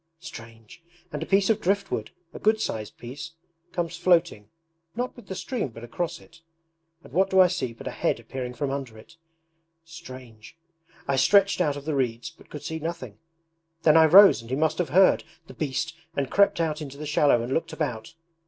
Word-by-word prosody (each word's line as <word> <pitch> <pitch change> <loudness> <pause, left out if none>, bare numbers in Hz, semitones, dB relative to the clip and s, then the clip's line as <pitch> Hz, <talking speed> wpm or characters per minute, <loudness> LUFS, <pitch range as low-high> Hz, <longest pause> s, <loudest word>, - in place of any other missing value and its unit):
Strange! 115 -5 -12 0.3
And 150 - -5
a 160 - -4
piece 195 +2 +3
of 220 - 0
driftwood, 200 +2 -1 0.2
a - - -8
good 220 +1 +2
sized 110 - -4
piece, 145 +7 -8 0.4
comes 170 -2 -3
floating, 170 - +1 0.5
not 250 +2 -3
with 240 - -14
the 190 - -5
stream 245 - -3
but 115 -2 -12
across 160 +8 -4
it; - - -19 0.6
and - - -16
what 190 +2 +2
do 190 - +3
I 185 - +9
see 175 -9 -2
but 115 - -12
a - - -3
head - - -1
appearing 125 -2 -6
from 140 -1 -2
under 135 -5 -5
it! 165 +10 -16 0.7
Strange! 130 -6 -12 0.5
I 140 -1 +1
stretched 200 +7 +4
out 145 -4 +1
of 140 - -9
the 155 - -1
reeds 120 -4 -2
but - - -21
could 150 - -8
see 160 0 -4
nothing; 155 -10 -6 0.6
then 155 -1 +5
I 160 0 +8
rose 195 - +8
and 115 - -13
he 130 - -1
must 155 +4 0
have 175 -5 0
heard, 185 +6 +5 0.2
the - - -12
beast, 155 +2 -3 0.2
and 135 -2 -1
crept 200 -3 +3
out 160 -2 -1
into 140 -2 -8
the 150 - -6
shallow 145 -4 +3
and 125 +3 -3
looked 165 +2 -1
about. 120 -5 -4
155 Hz, 200 wpm, -25 LUFS, 130-175 Hz, 0.7 s, I